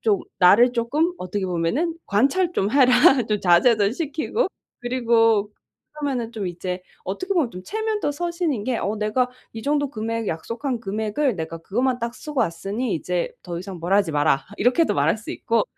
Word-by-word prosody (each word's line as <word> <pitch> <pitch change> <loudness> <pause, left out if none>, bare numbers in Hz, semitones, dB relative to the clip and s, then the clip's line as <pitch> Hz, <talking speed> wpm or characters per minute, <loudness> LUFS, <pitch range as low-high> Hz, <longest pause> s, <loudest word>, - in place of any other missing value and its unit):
좀 210 -4 +2 0.2
나를 205 +7 +6
쪼끔 285 +9 0
어떻게 190 +2 -3
보면은 185 - -1
"관찰 280 - +2
좀 200 - 0
해라, 260 -2 +5 0.4
좀 210 -1 0
자제도 200 +4 +4
시키고." 320 - -1 0.3
그리고 230 -4 +2 0.4
그러면은 270 -6 -3
좀 210 -4 -4
이제 180 +1 -4 0.2
어떻게 370 - -3
보면 300 -9 +2
좀 180 -3 -9
체면도 435 - -1
서시는 340 - -2
게 255 0 0
어 210 +3 -2
"내가 215 +4 0 0.2
이 225 - -6
정도 290 0 0
금액, 225 -2 -3
약속한 230 - -3
금액을 220 +5 -1
내가 165 0 -5
그것만 245 +9 -1
딱 235 0 -4
쓰고 295 -1 -4
왔으니 205 +5 -2
이제 175 +2 -2
더 175 -2 -5
이상 185 0 -7
뭐라 175 +4 +1
하지 195 -5 +1
마라." 145 -2 +2
이렇게도 250 +9 +2
말할 150 +8 +2
수 220 - -8
있고 230 -2 0
230 Hz, 345 characters per minute, -23 LUFS, 195-275 Hz, 0.4 s, 나를